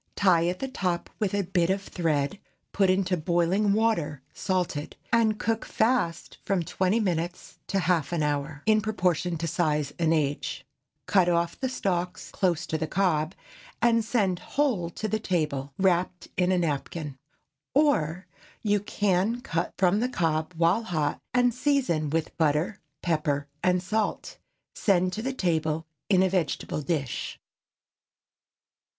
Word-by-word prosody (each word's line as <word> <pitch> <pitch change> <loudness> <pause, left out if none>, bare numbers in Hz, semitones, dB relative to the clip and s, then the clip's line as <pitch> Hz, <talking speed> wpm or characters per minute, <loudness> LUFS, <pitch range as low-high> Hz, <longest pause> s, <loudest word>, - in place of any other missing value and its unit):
Tie 175 -4 +4
at 180 +1 -1
the 270 - -3
top 180 -10 -2
with 205 -2 0
a 200 - +1
bit 175 -1 +1
of 195 +1 0
thread, 160 -1 -1 0.3
put 195 -2 +3
into 185 0 +2
boiling 175 +5 +2
water 200 - +1
salted, 180 -6 -2 0.2
and 220 -2 +4
cook 225 0 0
fast 220 -8 0
from 190 -3 0
twenty 190 +6 +1
minutes 175 -3 -2
to 195 - 0
half 170 -5 +1
an 165 -3 0
hour, 145 0 -2
in 215 0 +4
proportion 180 -5 0
to 165 - -3
size 150 -3 0
and 165 -1 +2
age. 145 -3 -1 0.4
Cut 185 -3 +4
off 170 0 0
the 260 - -1
stalks 180 -7 -2
close 175 -4 0
to 160 - -2
the 160 - -1
cob, 170 -2 +1 0.4
and 230 -1 +3
send 205 -6 +1
whole 245 -13 0
to 215 +5 -4
table 150 -8 -1
wrapped 180 -1 +1
in 180 +1 +2
a 185 - +3
napkin. 150 -2 -2 0.6
Or, 185 - +2 0.4
you 205 -1 +3
can 205 +2 0
cut 165 -7 -2
from 190 +2 +3
the 250 +3 0
cob 165 -5 -1
while 170 +6 +3
hot, 155 -9 -1
and 245 -1 +3
season 250 - +1
with 160 +1 -1
butter, 160 +6 +1 0.2
pepper 150 -4 0 0.2
and 180 0 +2
salt. 215 +2 -2 0.3
Send 185 -2 +2
to 230 +6 -2
table 160 -8 0 0.2
in 190 -2 +5
a 190 - +3
vegetable 175 -4 -1
dish. 145 -5 -3
180 Hz, 145 wpm, -27 LUFS, 160-205 Hz, 0.6 s, in